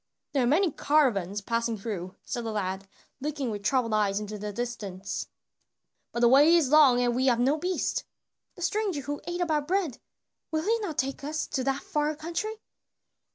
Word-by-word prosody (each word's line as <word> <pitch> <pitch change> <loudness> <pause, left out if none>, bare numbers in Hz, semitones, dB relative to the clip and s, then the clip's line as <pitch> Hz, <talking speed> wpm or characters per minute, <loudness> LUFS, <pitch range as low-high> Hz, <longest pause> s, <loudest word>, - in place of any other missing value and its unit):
"There 270 -3 +2
are - - +2
many 330 +6 +3
caravans 215 - +2
passing 230 +2 -1
through," 195 -4 -5
said 240 -2 -4
the 225 - -3
lad, 195 -2 -3 0.3
looking 285 -3 -2
with 205 -1 -4
troubled 235 +1 +1
eyes 205 -2 +2
into 210 0 -6
the 210 +1 -4
distance, 205 -4 -4 0.8
"but 235 - -3
the 240 - +7
way 290 +7 +7
is 305 -6 +3
long 285 -5 +7
and 245 -1 +1
we 260 +2 +2
have 240 -2 +3
no 265 +5 +3
beast." 360 +4 -1 0.5
"The 355 - -7
stranger 385 -4 0
who 285 +2 -4
ate 350 +1 -3
of 345 -2 0
our 300 -1 +2
bread, 335 -3 -1 0.5
will 315 0 -1
he 455 +5 +2
not 375 -9 -4
take 270 +2 -1
us 305 +2 -2
to 260 - -1
that 270 0 0
far 300 +1 0
country?" 340 +8 -3
265 Hz, 190 wpm, -28 LUFS, 225-310 Hz, 0.8 s, the